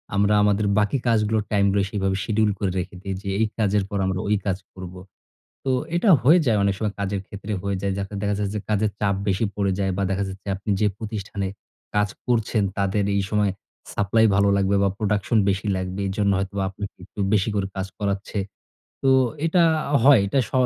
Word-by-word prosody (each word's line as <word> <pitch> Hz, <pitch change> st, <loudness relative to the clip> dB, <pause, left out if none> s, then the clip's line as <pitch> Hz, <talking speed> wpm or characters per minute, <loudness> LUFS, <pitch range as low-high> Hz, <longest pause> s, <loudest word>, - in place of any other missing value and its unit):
আমরা 100 Hz, +1 st, +3 dB
আমাদের 105 Hz, 0 st, +2 dB
বাকি 105 Hz, +6 st, +1 dB
কাজগুলো, 110 Hz, -1 st, +2 dB
টাইমগুলো 100 Hz, -1 st, +3 dB
সেভাবে 95 Hz, -2 st, -1 dB
শিডিউল 110 Hz, +1 st, +1 dB
করে 95 Hz, -3 st, 0 dB
রেখে 90 Hz, +1 st, -5 dB
দেই 95 Hz, -1 st, -4 dB
যে 100 Hz, -, -5 dB
এই 110 Hz, -, +4 dB
কাজের 105 Hz, -2 st, +2 dB
পর 100 Hz, -, -2 dB
আমরা 95 Hz, -1 st, -1 dB
ওই 105 Hz, -, +3 dB
কাজ 95 Hz, -2 st, 0 dB, 0.2 s
করবো। 90 Hz, -1 st, -9 dB, 0.6 s
তো 135 Hz, -, 0 dB, 0.2 s
এটা 195 Hz, +4 st, +3 dB
হয়ে 155 Hz, +9 st, +6 dB
যায় 115 Hz, -4 st, +3 dB
অনেক 100 Hz, 0 st, +2 dB
সময়। 105 Hz, -2 st, -2 dB
কাজের 100 Hz, -1 st, -2 dB
ক্ষেত্রে 100 Hz, +1 st, -7 dB
হয়ে 100 Hz, -1 st, -2 dB
যায়। 100 Hz, -1 st, -1 dB
যাতে 100 Hz, +1 st, -5 dB
দেখা 105 Hz, 0 st, 0 dB
যাচ্ছে 100 Hz, 0 st, -2 dB
যে -, -, -1 dB
কাজের 105 Hz, 0 st, +1 dB
চাপ 100 Hz, -2 st, +1 dB
বেশি 100 Hz, +3 st, +1 dB
পড়ে 100 Hz, -2 st, 0 dB
যায় 95 Hz, -1 st, +1 dB
বা 100 Hz, -, 0 dB
দেখা 95 Hz, +1 st, 0 dB
যাচ্ছে 95 Hz, +1 st, -10 dB
আপনি 100 Hz, +3 st, -8 dB
যে 105 Hz, -, +4 dB
প্রতিষ্ঠানে 105 Hz, -3 st, -4 dB, 0.5 s
কাজ 105 Hz, 0 st, +3 dB, 0.2 s
করছেন 115 Hz, -3 st, +1 dB
তাদের 100 Hz, +1 st, +1 dB
এই 100 Hz, -, +1 dB
সময় 105 Hz, -2 st, +2 dB, 0.4 s
সাপ্লাই 110 Hz, +3 st, +3 dB
ভালো 100 Hz, 0 st, +4 dB
লাগবে 100 Hz, 0 st, +2 dB
বা 100 Hz, -, +3 dB
প্রোডাকশন 105 Hz, +1 st, 0 dB
বেশি 100 Hz, +2 st, -1 dB
লাগবে। 95 Hz, +1 st, -4 dB
এজন্য 100 Hz, +1 st, +1 dB
হয়তোবা 100 Hz, 0 st, -2 dB
আপনাকে 100 Hz, +1 st, -7 dB
একটু 105 Hz, -, -14 dB
বেশি 105 Hz, +1 st, +2 dB
করে 100 Hz, -1 st, 0 dB
কাজ 95 Hz, 0 st, -3 dB
করাচ্ছে। 100 Hz, 0 st, -2 dB, 0.6 s
তো 135 Hz, -, +4 dB, 0.4 s
এটা 170 Hz, +1 st, +4 dB, 0.3 s
আ -, -, -1 dB
হয়। 135 Hz, -3 st, +8 dB
এটা 135 Hz, -, +1 dB
স -, -, -25 dB
100 Hz, 200 wpm, -23 LUFS, 95-105 Hz, 0.6 s, হয়